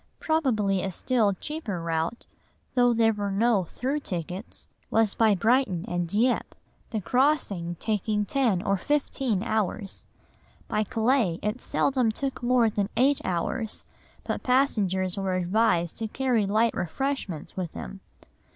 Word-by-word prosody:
Probably 220 Hz, -, +1 dB
a 195 Hz, -, -2 dB
still 215 Hz, +2 st, +1 dB
cheaper 235 Hz, -, -4 dB
route, 165 Hz, +6 st, -2 dB, 0.5 s
though 245 Hz, -1 st, +4 dB
there 225 Hz, -1 st, +3 dB
were 205 Hz, -1 st, -2 dB
no 200 Hz, -1 st, +2 dB
through 265 Hz, -, -2 dB
tickets, 180 Hz, -, -5 dB, 0.2 s
was 225 Hz, -2 st, +3 dB
by 220 Hz, -3 st, +4 dB
Brighton 220 Hz, -3 st, +2 dB
and 175 Hz, -1 st, -1 dB
Dieppe, 230 Hz, +8 st, 0 dB, 0.3 s
the 220 Hz, -3 st, -2 dB
crossing 205 Hz, -, +1 dB
taking 210 Hz, -1 st, 0 dB
ten 225 Hz, -6 st, +1 dB
or 195 Hz, 0 st, +1 dB
fifteen 265 Hz, -4 st, 0 dB
hours. 215 Hz, -2 st, -2 dB, 0.6 s
By 215 Hz, -, 0 dB
Calais 225 Hz, -5 st, +1 dB
it 210 Hz, +4 st, -2 dB
seldom 255 Hz, -5 st, +1 dB
took 270 Hz, +3 st, -3 dB
more 245 Hz, -1 st, +3 dB
than 205 Hz, -2 st, -1 dB
eight 270 Hz, +3 st, +3 dB
hours, 190 Hz, +5 st, -2 dB, 0.4 s
but -, -, -3 dB
passengers 200 Hz, -8 st, +1 dB
were 190 Hz, -1 st, -1 dB
advised 180 Hz, -2 st, +1 dB
to 225 Hz, -, -2 dB
carry 240 Hz, -3 st, +1 dB
light 220 Hz, +3 st, +2 dB
refreshments 195 Hz, -, -3 dB
with 180 Hz, -4 st, -4 dB
them. 60 Hz, 0 st, -7 dB
215 Hz, 135 wpm, -26 LUFS, 185-250 Hz, 0.6 s, though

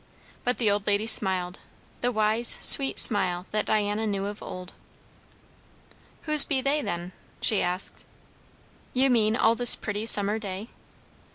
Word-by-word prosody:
But 245 Hz, -, -4 dB
the 220 Hz, -4 st, -1 dB
old 205 Hz, 0 st, -5 dB
lady 205 Hz, +1 st, -2 dB
smiled; 190 Hz, -5 st, -2 dB, 0.4 s
the 245 Hz, -, -3 dB
wise, 220 Hz, +1 st, +2 dB
sweet 270 Hz, -1 st, +5 dB
smile 185 Hz, -5 st, +4 dB
that 215 Hz, -, -4 dB
Diana 210 Hz, +1 st, -3 dB
knew 200 Hz, -1 st, -5 dB
of 205 Hz, +1 st, -9 dB
old. 185 Hz, 0 st, -11 dB, 1.5 s
"Whose 305 Hz, -2 st, +7 dB
be 275 Hz, -, -4 dB
they, 280 Hz, +3 st, -3 dB
then?" 175 Hz, -6 st, -7 dB, 0.3 s
she 215 Hz, -, 0 dB
asked. 180 Hz, +2 st, +2 dB, 0.9 s
"You 260 Hz, +1 st, 0 dB
mean, 220 Hz, -2 st, -1 dB
all 225 Hz, -1 st, 0 dB
this 245 Hz, 0 st, +3 dB
pretty 210 Hz, +1 st, -7 dB
summer 210 Hz, 0 st, +1 dB
day?" 200 Hz, +2 st, -9 dB
210 Hz, 145 wpm, -23 LUFS, 195-235 Hz, 1.5 s, Whose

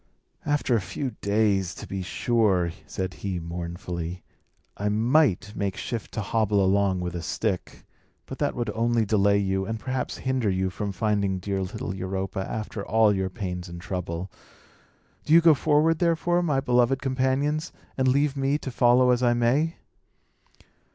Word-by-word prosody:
"After 145 Hz, -4 st, +2 dB
a 110 Hz, -, +1 dB
few 110 Hz, +8 st, -4 dB
days, 100 Hz, -3 st, +1 dB
to -, -, -8 dB
be 95 Hz, -1 st, -4 dB
sure," 95 Hz, -2 st, +1 dB, 0.2 s
said 95 Hz, -1 st, -4 dB
he, 95 Hz, -3 st, -2 dB
mournfully, 85 Hz, +1 st, -5 dB, 0.5 s
"I 105 Hz, +1 st, -1 dB
might 110 Hz, -, +2 dB
make 100 Hz, -2 st, -2 dB
shift 115 Hz, -3 st, -4 dB
to 110 Hz, -, -2 dB
hobble 105 Hz, -2 st, +1 dB
along 95 Hz, -1 st, +2 dB
with 90 Hz, -1 st, -3 dB
a 85 Hz, -, -3 dB
stick. 95 Hz, +3 st, -3 dB, 0.4 s
But -, -, -8 dB
that -, -, 0 dB
would 120 Hz, -3 st, -2 dB
only 115 Hz, +1 st, +1 dB
delay 100 Hz, -1 st, +3 dB
you, 95 Hz, -1 st, 0 dB
and 110 Hz, 0 st, -3 dB
perhaps 130 Hz, +2 st, -3 dB
hinder 130 Hz, -5 st, 0 dB
you 95 Hz, 0 st, 0 dB
from 100 Hz, +1 st, -3 dB
finding 100 Hz, -1 st, 0 dB
dear 95 Hz, +1 st, -2 dB
little 95 Hz, 0 st, -4 dB
Europa, 95 Hz, +1 st, -3 dB
after 110 Hz, -1 st, -4 dB
all 110 Hz, -1 st, +3 dB
your 95 Hz, -1 st, -1 dB
pains 90 Hz, -3 st, -5 dB
and 85 Hz, 0 st, -8 dB
trouble. 90 Hz, 0 st, -4 dB, 0.9 s
Do 155 Hz, -, +1 dB
you -, -, +10 dB
go 165 Hz, -1 st, +6 dB
forward, 155 Hz, +3 st, +2 dB
therefore, 175 Hz, 0 st, +2 dB
my 150 Hz, -6 st, +1 dB
beloved 125 Hz, 0 st, +2 dB
companions, 135 Hz, +3 st, 0 dB, 0.2 s
and 130 Hz, -1 st, +1 dB
leave 140 Hz, +2 st, +2 dB
me 135 Hz, +1 st, +1 dB
to 135 Hz, -, -6 dB
follow 125 Hz, +1 st, +4 dB
as 125 Hz, 0 st, +2 dB
I 120 Hz, -1 st, +3 dB
may." 135 Hz, +8 st, +2 dB
105 Hz, 165 wpm, -26 LUFS, 95-130 Hz, 0.9 s, you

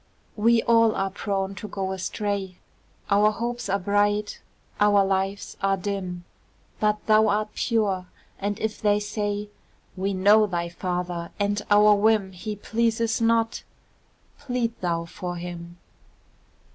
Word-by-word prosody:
We 230 Hz, +2 st, +3 dB
all 230 Hz, -2 st, +4 dB
are 195 Hz, 0 st, -1 dB
prone 195 Hz, -1 st, -2 dB
to 195 Hz, +2 st, -7 dB
go 190 Hz, -2 st, -3 dB
astray, 190 Hz, 0 st, -3 dB, 0.5 s
Our 205 Hz, +1 st, +5 dB
hopes 235 Hz, +1 st, -4 dB
are 200 Hz, -, +2 dB
bright, 205 Hz, +2 st, 0 dB, 0.4 s
our 205 Hz, -1 st, +5 dB
lives 195 Hz, +1 st, -2 dB
are 195 Hz, 0 st, +2 dB
dim; 185 Hz, -2 st, -4 dB, 0.6 s
But 210 Hz, 0 st, 0 dB
thou 215 Hz, 0 st, +5 dB
art 210 Hz, +1 st, +1 dB
pure, 200 Hz, -6 st, 0 dB, 0.3 s
and 205 Hz, +1 st, -2 dB
if 220 Hz, -1 st, -3 dB
they 205 Hz, -1 st, +3 dB
say, 205 Hz, 0 st, -3 dB, 0.5 s
"We 195 Hz, +1 st, -1 dB
know 210 Hz, +3 st, +5 dB
thy 170 Hz, -3 st, -2 dB
father, 175 Hz, -1 st, -3 dB
and 205 Hz, 0 st, 0 dB
our 210 Hz, 0 st, +6 dB
whim 205 Hz, -1 st, +2 dB
He 210 Hz, +4 st, -6 dB
pleases 230 Hz, +2 st, 0 dB
not," 230 Hz, 0 st, +2 dB, 0.8 s
plead 250 Hz, -4 st, -2 dB
thou 170 Hz, -2 st, -1 dB
for 175 Hz, +1 st, -6 dB
him. 175 Hz, 0 st, -7 dB
205 Hz, 135 wpm, -25 LUFS, 190-215 Hz, 0.8 s, our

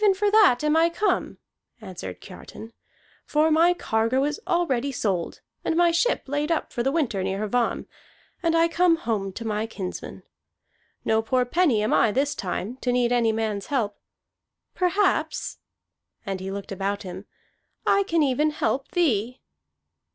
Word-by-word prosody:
"Even 400 Hz, -2 st, +5 dB
for 410 Hz, +1 st, +1 dB
that 390 Hz, -, +5 dB
am 300 Hz, +1 st, +2 dB
I 330 Hz, +1 st, +4 dB
come," 370 Hz, +2 st, -1 dB, 0.4 s
answered -, -, -8 dB
Kiartan. 225 Hz, +1 st, -11 dB, 0.5 s
"For 310 Hz, +1 st, +2 dB
my 335 Hz, +3 st, +4 dB
cargo 230 Hz, -2 st, 0 dB
is 295 Hz, +1 st, -1 dB
already 280 Hz, -6 st, +1 dB
sold, 195 Hz, -9 st, -2 dB, 0.2 s
and 320 Hz, -, 0 dB
my 345 Hz, 0 st, +4 dB
ship 350 Hz, +9 st, +1 dB
laid 290 Hz, +3 st, -2 dB
up 330 Hz, -, -1 dB
for 240 Hz, -, -1 dB
the 265 Hz, +3 st, +1 dB
winter 270 Hz, -, 0 dB
near 195 Hz, +3 st, -2 dB
Hvamm, 245 Hz, +2 st, 0 dB, 0.6 s
and 330 Hz, -1 st, +2 dB
I 330 Hz, 0 st, +4 dB
come 340 Hz, 0 st, +3 dB
home 220 Hz, -, -2 dB
to 230 Hz, -, -7 dB
my 215 Hz, 0 st, -1 dB
kinsman. 190 Hz, -5 st, -7 dB, 0.8 s
No 220 Hz, 0 st, +2 dB
poor 250 Hz, +3 st, +1 dB
penny 255 Hz, -6 st, +2 dB
am 215 Hz, -, +1 dB
I 225 Hz, -, +4 dB
this 280 Hz, +5 st, 0 dB
time, 200 Hz, +5 st, -4 dB
to 250 Hz, -, -1 dB
need 245 Hz, -1 st, +2 dB
any 235 Hz, -2 st, +3 dB
man's 215 Hz, -3 st, -2 dB
help. 225 Hz, -8 st, -1 dB, 0.7 s
Perhaps," 375 Hz, +3 st, 0 dB, 0.7 s
and 195 Hz, -2 st, -3 dB
he 190 Hz, +1 st, -5 dB
looked 200 Hz, +1 st, -6 dB
about 195 Hz, +1 st, -2 dB
him, 185 Hz, +1 st, -8 dB, 0.6 s
"I 395 Hz, -, +4 dB
can 335 Hz, -5 st, +1 dB
even 290 Hz, +3 st, +2 dB
help 280 Hz, -3 st, -1 dB
thee." 250 Hz, -, +1 dB
255 Hz, 160 wpm, -25 LUFS, 215-330 Hz, 0.8 s, Even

